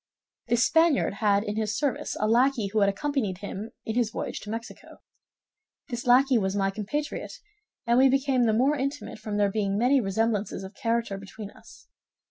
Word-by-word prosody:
"This 240 Hz, 0 st, +3 dB
Spaniard 325 Hz, -7 st, +3 dB
had 205 Hz, -1 st, +3 dB
in 210 Hz, -1 st, -4 dB
his 215 Hz, -1 st, -1 dB
service 285 Hz, -4 st, -2 dB
a 215 Hz, -, +1 dB
lackey 240 Hz, -2 st, +2 dB
who 220 Hz, -, +2 dB
had 200 Hz, -1 st, +4 dB
accompanied 215 Hz, -3 st, -2 dB
him 205 Hz, +2 st, -6 dB, 0.2 s
in 220 Hz, -, -2 dB
his 240 Hz, -1 st, +1 dB
voyage -, -, -5 dB
to 210 Hz, -, -10 dB
Mexico. 225 Hz, +2 st, -8 dB, 0.9 s
This 240 Hz, -1 st, -5 dB
lackey 255 Hz, 0 st, +5 dB
was 190 Hz, -1 st, -1 dB
my 195 Hz, -1 st, +1 dB
compatriot; 220 Hz, +9 st, -4 dB, 0.5 s
and 235 Hz, +1 st, +3 dB
we 265 Hz, 0 st, +6 dB
became 265 Hz, -2 st, +2 dB
the -, -, +3 dB
more 265 Hz, +7 st, +3 dB
intimate 275 Hz, -3 st, -4 dB
from 215 Hz, -1 st, -4 dB
there 205 Hz, -1 st, +2 dB
being 200 Hz, -1 st, -1 dB
many 255 Hz, +4 st, +3 dB
resemblances 210 Hz, -1 st, -1 dB
of 190 Hz, +2 st, -9 dB
character 230 Hz, -2 st, -1 dB
between 200 Hz, +1 st, -9 dB
us. -, -, -17 dB
225 Hz, 180 wpm, -26 LUFS, 205-255 Hz, 0.9 s, we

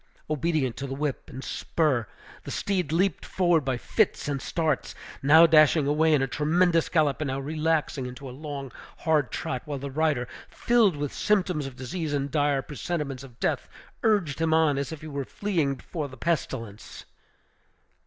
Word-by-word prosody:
Obedient 150 Hz, -4 st, 0 dB
to 140 Hz, -, -4 dB
the 135 Hz, -, -4 dB
whip 145 Hz, -1 st, -3 dB
and 130 Hz, -, -8 dB
spur, 140 Hz, -9 st, 0 dB, 0.4 s
the -, -, -8 dB
steed 190 Hz, -5 st, -1 dB
leaped 185 Hz, +4 st, +1 dB
forward 175 Hz, -4 st, +2 dB
by 130 Hz, -2 st, -1 dB
fits 210 Hz, -, 0 dB
and 140 Hz, -2 st, -2 dB
starts, 160 Hz, -4 st, -1 dB, 0.3 s
now 160 Hz, +4 st, +8 dB
dashing 155 Hz, -2 st, +5 dB
away 155 Hz, +3 st, +3 dB
in 145 Hz, -3 st, +4 dB
a -, -, 0 dB
tremendous 165 Hz, +4 st, +2 dB
gallop, 155 Hz, -4 st, +2 dB
and 150 Hz, -, -1 dB
now 135 Hz, 0 st, -2 dB
relaxing 155 Hz, -2 st, -1 dB
into 125 Hz, +2 st, -8 dB
a -, -, -7 dB
long, 140 Hz, -2 st, -6 dB, 0.3 s
hard 155 Hz, -5 st, +2 dB
trot; 125 Hz, -, -3 dB
while 145 Hz, -2 st, -4 dB
the 140 Hz, +1 st, -6 dB
rider, 145 Hz, -4 st, +1 dB, 0.2 s
filled 230 Hz, -7 st, +3 dB
with 145 Hz, -1 st, -3 dB
symptoms 180 Hz, -8 st, +1 dB
of 135 Hz, -, -9 dB
disease 145 Hz, +5 st, -4 dB
and 140 Hz, -1 st, -1 dB
dire 145 Hz, -2 st, +1 dB
presentiments 150 Hz, -3 st, -4 dB
of 125 Hz, -3 st, -14 dB
death, -, -, -1 dB, 0.3 s
urged 200 Hz, -, +1 dB
him 160 Hz, -1 st, +3 dB
on, 155 Hz, -4 st, +3 dB
as 140 Hz, +1 st, -3 dB
if 160 Hz, -, -7 dB
he 155 Hz, -, -8 dB
were 140 Hz, -2 st, -3 dB
fleeing 160 Hz, -4 st, -1 dB
before 150 Hz, +3 st, -5 dB
the 130 Hz, -1 st, -12 dB
pestilence. 115 Hz, -9 st, -3 dB
150 Hz, 175 wpm, -26 LUFS, 135-160 Hz, 0.4 s, now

